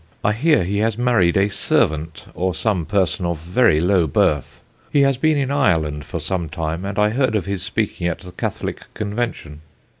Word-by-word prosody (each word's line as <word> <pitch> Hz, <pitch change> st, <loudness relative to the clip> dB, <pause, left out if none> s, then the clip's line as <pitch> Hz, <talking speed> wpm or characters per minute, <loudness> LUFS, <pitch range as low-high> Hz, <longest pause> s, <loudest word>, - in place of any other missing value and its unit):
I 105 Hz, -, +2 dB
hear 150 Hz, -, +3 dB
he 100 Hz, +3 st, -1 dB
has 110 Hz, 0 st, 0 dB
married 120 Hz, -9 st, +2 dB
a 100 Hz, +1 st, +3 dB
servant, 80 Hz, -5 st, 0 dB
or 90 Hz, 0 st, -1 dB
some 95 Hz, -6 st, -1 dB
person 95 Hz, -3 st, 0 dB
of 85 Hz, -1 st, -2 dB
very 85 Hz, +2 st, +2 dB
low 90 Hz, -1 st, +2 dB
birth; 70 Hz, -1 st, 0 dB, 0.3 s
he 145 Hz, -, +4 dB
has 135 Hz, -1 st, +3 dB
been 155 Hz, +3 st, +2 dB
in 135 Hz, -1 st, -1 dB
Ireland 80 Hz, -, +1 dB
for 85 Hz, +2 st, -5 dB
some 85 Hz, 0 st, -3 dB
time, 80 Hz, +3 st, -3 dB
and 100 Hz, +1 st, -4 dB
I 105 Hz, 0 st, +3 dB
heard 130 Hz, -1 st, +1 dB
of 100 Hz, -, 0 dB
his 100 Hz, -2 st, -3 dB
speaking 100 Hz, -3 st, -2 dB
at 85 Hz, -, -3 dB
the 90 Hz, -2 st, -10 dB
Catholic -, -, -5 dB
Convention. 105 Hz, -8 st, -4 dB
95 Hz, 190 wpm, -20 LUFS, 85-110 Hz, 0.3 s, he